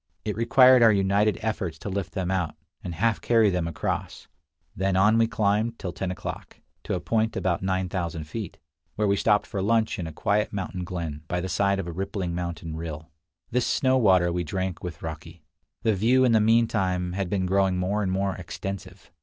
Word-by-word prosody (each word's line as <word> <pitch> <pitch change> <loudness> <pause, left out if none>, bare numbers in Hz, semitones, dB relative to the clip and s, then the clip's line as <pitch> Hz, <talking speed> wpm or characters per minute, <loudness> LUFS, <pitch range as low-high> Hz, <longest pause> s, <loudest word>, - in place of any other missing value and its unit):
It 105 - -2
required 125 +3 +6
our 115 -1 +7
united 100 +1 +2
efforts 100 -7 -2
to 80 - -8
lift 100 -2 -3
them 95 -1 -2
out, 90 -5 -1 0.3
and 90 -4 -5
half 110 +5 +1
carry 115 -4 +4
them 90 -2 -1
across. 85 - -4 0.5
Then 95 0 0
on 105 +4 +4
we 115 - +4
climbed 110 +1 0
till 90 - -5
ten 95 - -3
o'clock, 90 - -7 0.3
to - - -1
a - - -2
point 110 +4 0
about 90 -2 0
9000 95 -3 -2
feet, 95 +5 -6 0.4
where 105 -1 +1
we 100 - +3
stopped 105 0 +2
for 100 - -4
lunch 110 +1 +1
in 85 - -3
a - - -6
quiet 105 +7 0
mountain 95 -2 -4
glen, 85 -5 -5
by 90 - -1
the 90 - -3
side 100 +1 +1
of 95 - -3
a 85 - -5
rippling 95 -1 -3
mountain 85 -2 -4
rill. 80 -1 -7 0.4
This 125 0 +1
snow 130 -1 +2
water 95 -8 +4
we 90 0 -1
drank 95 +2 -3
with 90 -2 -7
raki. 80 +1 -8 0.4
The 110 -2 +3
view 120 +6 +3
in 125 - +3
the 110 -1 +4
mean 115 +2 +4
time 90 -5 -1
had 95 -1 -2
been 95 -1 0
growing 95 0 +2
more 95 +4 0
and 95 -2 -1
more 95 +1 0
extensive. 95 +2 -7
95 Hz, 205 wpm, -26 LUFS, 90-105 Hz, 0.5 s, our